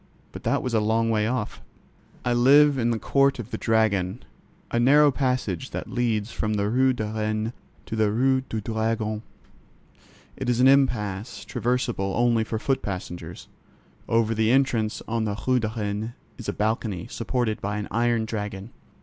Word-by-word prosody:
But - - -9
that - - +1
was 125 - -3
a 110 - +4
long 115 +2 +1
way 105 -1 +1
off. 120 -3 -3 0.6
I 120 - +2
live 140 +3 +5
in 120 -1 +1
the 115 - +1
Court 140 +4 +2
of 120 -1 -7
the - - -2
Dragon, 110 -2 +1 0.5
a 120 - +1
narrow 145 +4 +6
passage 130 0 -1
that - - -6
leads 115 -3 0
from 110 -2 -2
the 100 0 0
Rue 130 +2 +4
de 120 -4 -2
Rennes 110 +1 -2 0.3
to - - -5
the 110 -1 +2
Rue 130 +4 +2
du 115 -4 -5
Dragon. 110 0 -1 1.1
It - - -3
is 120 -1 +1
an 130 - +6
"impasse"; 110 -6 +1
traversable 115 -2 -1
only 120 -1 +3
for 110 0 -3
foot 135 +4 0
passengers. 90 -3 -6 0.6
Over 115 -1 +2
the 110 0 +1
entrance 120 -5 +1
on 115 -1 -1
the 105 0 -3
Rue 130 -1 +3
de 110 -2 -1
Rennes 105 +2 -3 0.3
is 120 - -5
a - - -1
balcony, 105 -4 -1
supported 115 -2 -2
by 105 +1 -2
an 105 - -4
iron 115 0 +1
dragon. 105 -1 -5
115 Hz, 175 wpm, -25 LUFS, 105-125 Hz, 1.1 s, narrow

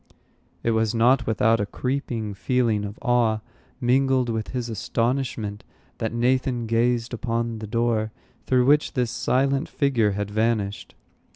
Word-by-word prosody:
It 115 - +2
was 110 0 +1
not 125 +3 +3
without 110 +1 +3
a 105 - 0
creeping 120 -4 -3
feeling 110 +1 0
of 100 +1 -7
awe, 115 -3 +2 0.4
mingled 130 0 +2
with 110 -1 -2
his 125 -2 -3
astonishment, 115 -1 -2 0.4
that 110 - -1
Nathan 125 +1 +1
gazed 115 +1 +1
upon 115 -1 -2
the 110 - -6
door 115 -1 0 0.4
through 125 -1 +3
which 150 +3 +3
this 125 -4 0
silent 135 +3 +1
figure 120 -8 +1
had 105 0 -3
vanished. 110 -2 -1
115 Hz, 135 wpm, -24 LUFS, 110-125 Hz, 0.4 s, not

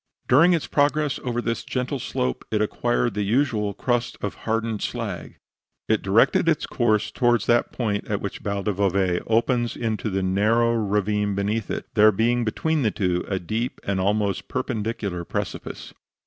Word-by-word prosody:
During 165 +8 +6
its 165 - 0
progress 145 0 +1
over 120 -1 -2
this 115 0 -2
gentle 130 +2 -2
slope, 65 - -2
it 110 - 0
acquired 120 +2 0
the 105 - -2
usual 105 -2 +1
crust 120 -1 -1
of 100 - -3
hardened 115 -1 -2
slag. - - -4 0.5
It - - +2
directed - - +3
its - - +1
course 110 -3 +1
towards 120 -3 +2
that 120 0 +2
point 105 -4 -2
at 100 -2 -1
which 100 - -5
Val 100 -1 -3
del 105 - 0
Bove 95 -2 +1
opens 120 +1 +1
into 110 -2 -2
the 95 -1 -1
narrow 110 +5 +2
ravine 105 -1 0
beneath 105 +2 -1
it - - -3
there 110 0 +6
being 120 +4 +1
between 155 +8 0
the 115 - +2
two 90 -4 -1
a 95 - -1
deep 110 +7 -3
and 100 -1 -1
almost 100 0 0
perpendicular 110 -7 -3
precipice. - - -5
110 Hz, 165 wpm, -24 LUFS, 100-120 Hz, 0.5 s, During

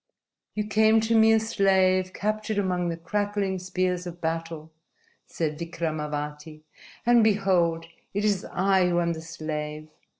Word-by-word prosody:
"You 210 -1 -1
came 220 +1 +4
to 225 +1 +1
me 220 0 +6
a 220 - +5
slave 190 -4 +2
captured 215 +1 -2
among 180 -3 0
the 165 - -3
crackling 200 +2 -2
spears 180 -1 -2
of 175 0 -8
battle," 165 -1 -4 0.6
said 155 -2 -3
Vikramavati, 155 -2 -4 0.4
"and 240 -1 +5
behold, 185 -6 +2 0.3
it 205 +2 -1
is 200 -3 +1
I 190 -2 +2
who 175 0 +1
am 170 -1 0
the 160 - -7
slave. 155 -1 -5
180 Hz, 140 wpm, -26 LUFS, 165-205 Hz, 0.6 s, me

